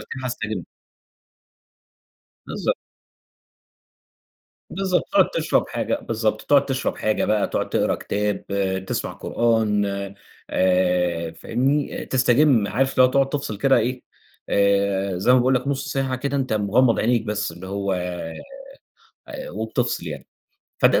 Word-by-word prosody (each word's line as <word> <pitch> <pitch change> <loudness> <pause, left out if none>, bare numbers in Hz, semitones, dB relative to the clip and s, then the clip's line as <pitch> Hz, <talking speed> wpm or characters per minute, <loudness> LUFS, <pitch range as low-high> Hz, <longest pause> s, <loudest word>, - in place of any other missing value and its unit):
ده - - -11
كده 130 -1 -6
هاستجم. 110 -7 -4 1.8
بالضبط. - - -1 1.9
بالضبط، 190 -1 0
تقعد 300 - +4
تشرب - - 0
حاجة، - - -1
بالضبط، 110 - -1
تقعد 145 -1 +4
تشرب 135 -1 -2
حاجة 110 0 0
بقى، 105 -1 +1
تقعد - - -2
تقرا - - +1
كتاب، 105 0 -2 0.4
تسمع - - -2
قرآن 110 -3 +1 0.6
آآ، 90 -2 +1
فاهمني؟ 135 - -1
تستجم 125 -3 +3
عارف 130 +7 +1
اللي 130 - +5
هو 125 - +4
تقعد 135 0 +2
تفصل 140 -7 -3
كده 135 +4 +4
إيه، 125 +2 -1 0.5
آآ، 100 -1 +2
زي 95 +7 +3
ما 130 - +6
باقول 130 +2 +3
لك 125 +2 -1
نُص 140 -1 -2
ساعة 135 -1 0
كده، 140 +2 -2
أنتَ 130 -3 -1
مغمّض 110 +4 +3
عينيك 120 0 +2
بس، 105 -3 -2
اللي 85 +3 -10
هو 100 0 -2
آآ 90 - -6 0.9
وبتفصل - - -2
يعني، - - -7 0.5
فده - - +4
115 Hz, 130 wpm, -23 LUFS, 100-135 Hz, 1.9 s, ما